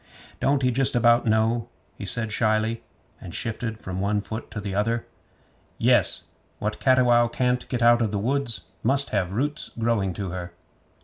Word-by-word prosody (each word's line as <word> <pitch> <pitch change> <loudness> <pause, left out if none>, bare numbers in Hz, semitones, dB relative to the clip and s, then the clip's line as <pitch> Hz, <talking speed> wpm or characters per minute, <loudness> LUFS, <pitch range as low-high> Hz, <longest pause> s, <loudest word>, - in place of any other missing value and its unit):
'Don't 140 0 +1
he 125 - +3
justabout 120 -2 +3
know?' 110 +2 +1 0.3
he 100 - -7
said 110 +3 +3
shyly, 110 +1 +1 0.4
and - - -7
shifted 115 0 -3
from 95 -3 -5
one 105 +1 +1
foot 110 +2 -6
to 105 - -6
the 100 -1 -5
other. 115 +4 0 0.7
'Yes. - - +3 0.3
"What 105 +1 -3
Cattiwow 125 -3 +4
can't 125 +1 -1
get 120 -2 -1
out 120 0 +5
of 110 - +1
the 105 - -2
woods 120 +2 -1 0.2
must 135 +4 +2
have 95 -4 0
roots 145 +7 -1
growing 115 -4 0
to 95 -1 -5
her." 90 -1 -6
115 Hz, 165 wpm, -24 LUFS, 105-120 Hz, 0.7 s, out